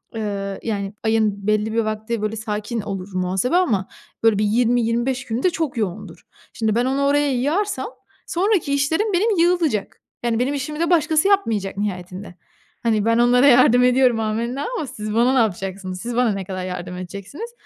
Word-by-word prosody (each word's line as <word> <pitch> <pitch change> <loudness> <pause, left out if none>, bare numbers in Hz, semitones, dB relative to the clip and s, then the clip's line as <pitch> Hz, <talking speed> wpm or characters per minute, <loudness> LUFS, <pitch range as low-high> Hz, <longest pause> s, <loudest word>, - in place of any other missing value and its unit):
eee, 200 -3 -3
yani, 200 -3 -3
ayın 215 -3 0
belli 215 +1 +1
bir 230 - +1
vakti, 220 0 -2
böyle, 215 +1 -2
sakin 215 +1 -3
olur 195 -2 -5
muhasebe 185 - 0
ama, 220 - +2 0.4
böyle, 225 -3 +4
bir 210 - +2
20-25 240 +3 +1
günü 230 +3 -3
de 365 - +5
çok 320 -6 -3
yoğundur. 200 -6 -4 0.3
Şimdi, 220 -3 0
ben 240 +1 +2
onu 270 +2 0
oraya 290 0 +2
yığarsam 340 +12 -1 0.4
sonraki 360 -5 +1
işlerim 320 +10 +1
benim 405 +2 +2
yığılacak. 335 - +1 0.2
Yani, 230 -1 0
benim 260 +3 0
işimi 290 +2 -4
de 335 0 +1
başkası 315 0 +3
yapmayacak 225 - +1
nihayetinde. 185 -1 -5 0.5
Hani, 220 -2 +1
ben 230 0 +3
onlara 245 +3 +5
yardım 250 -1 +6
ediyorum 250 -2 +4
amenna 230 +5 -2
ama 295 - -3
siz 215 -4 -6
bana 240 +3 +3
ne 265 - +3
yapacaksınız? 190 -3 -2
Siz 240 0 -4
bana 245 -2 +3
ne 195 -1 -4
kadar 185 0 -5
yardım 180 0 -5
edeceksiniz? 200 - -7
230 Hz, 175 wpm, -21 LUFS, 205-275 Hz, 0.5 s, yardım